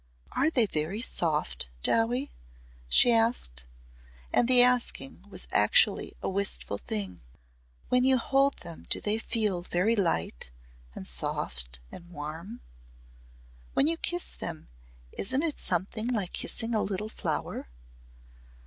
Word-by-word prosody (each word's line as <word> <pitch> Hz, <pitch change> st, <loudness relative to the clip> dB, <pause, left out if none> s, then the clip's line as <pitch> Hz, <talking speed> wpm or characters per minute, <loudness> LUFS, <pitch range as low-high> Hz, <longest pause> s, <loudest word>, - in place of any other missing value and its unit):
"Are 290 Hz, -, +2 dB
they 250 Hz, -8 st, +4 dB
very 170 Hz, +2 st, -2 dB
soft, 150 Hz, -, -1 dB
Dowie?" 245 Hz, +5 st, +2 dB, 0.6 s
she 240 Hz, -, +6 dB
asked 225 Hz, -, +2 dB, 0.7 s
and 235 Hz, -, +4 dB
the 250 Hz, -1 st, +8 dB
asking 240 Hz, -, +2 dB
was -, -, -4 dB
actually -, -, +3 dB
a -, -, -1 dB
wistful 195 Hz, -, -1 dB
thing. 95 Hz, -4 st, -3 dB, 0.7 s
"When 250 Hz, 0 st, +3 dB
you 260 Hz, 0 st, +5 dB
hold 275 Hz, +3 st, +2 dB
them 170 Hz, -1 st, -10 dB
do -, -, +3 dB
they 215 Hz, +1 st, 0 dB
feel 215 Hz, -6 st, +1 dB
very 185 Hz, +6 st, +1 dB
light 85 Hz, -, 0 dB, 0.5 s
and -, -, -7 dB
soft -, -, -4 dB
and 175 Hz, 0 st, -11 dB
warm? 165 Hz, +8 st, -7 dB, 1.1 s
When -, -, +4 dB
you 330 Hz, +2 st, +2 dB
kiss 350 Hz, +1 st, -1 dB
them 160 Hz, -, -7 dB, 0.4 s
isn't 260 Hz, +9 st, 0 dB
it 320 Hz, -3 st, -1 dB
something 190 Hz, +6 st, -2 dB
like 215 Hz, -8 st, -1 dB
kissing 230 Hz, 0 st, -1 dB
a 215 Hz, -, +2 dB
little 200 Hz, +2 st, -2 dB
flower?" -, -, -3 dB
210 Hz, 130 wpm, -28 LUFS, 160-245 Hz, 1.1 s, the